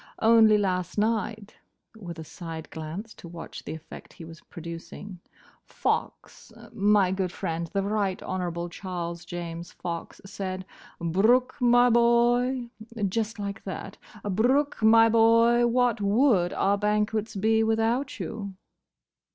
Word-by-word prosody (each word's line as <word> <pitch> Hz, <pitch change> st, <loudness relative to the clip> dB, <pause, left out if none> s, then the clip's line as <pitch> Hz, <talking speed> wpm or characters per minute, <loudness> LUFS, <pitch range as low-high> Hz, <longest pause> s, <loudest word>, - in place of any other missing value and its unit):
Only 220 Hz, -1 st, +6 dB
last 185 Hz, -3 st, -1 dB
night," 215 Hz, -1 st, -1 dB, 0.4 s
with 175 Hz, -6 st, -8 dB
a 160 Hz, -, -7 dB
side 160 Hz, -1 st, -8 dB
glance 165 Hz, +8 st, -7 dB
to -, -, -12 dB
watch 165 Hz, 0 st, -9 dB
the 155 Hz, -, -6 dB
effect 160 Hz, 0 st, -12 dB
he 165 Hz, -, -11 dB
was 165 Hz, +1 st, -12 dB
producing, 170 Hz, +3 st, -9 dB, 0.4 s
"Fox—my 200 Hz, -2 st, -1 dB
good 190 Hz, -2 st, -1 dB
friend, 165 Hz, -1 st, -3 dB
the 195 Hz, -1 st, 0 dB
Right 200 Hz, -2 st, -1 dB
Honourable 175 Hz, -2 st, -3 dB
Charles 175 Hz, -1 st, -6 dB
James 170 Hz, -1 st, -6 dB
Fox—said, 185 Hz, +2 st, -6 dB, 0.3 s
'Brooke, 220 Hz, +10 st, +2 dB
my 245 Hz, 0 st, +5 dB
boy'—just 235 Hz, -2 st, +1 dB
like 200 Hz, 0 st, -5 dB
that—'Brooke, 220 Hz, +8 st, -2 dB
my 225 Hz, +1 st, +6 dB
boy, 230 Hz, +1 st, +4 dB
what 240 Hz, -2 st, +1 dB
would 200 Hz, -3 st, +3 dB
our 200 Hz, +1 st, +1 dB
banquets 210 Hz, +1 st, 0 dB
be 220 Hz, +3 st, +2 dB
without 225 Hz, +5 st, 0 dB
you? 200 Hz, -4 st, -5 dB
205 Hz, 115 wpm, -26 LUFS, 180-230 Hz, 0.4 s, Only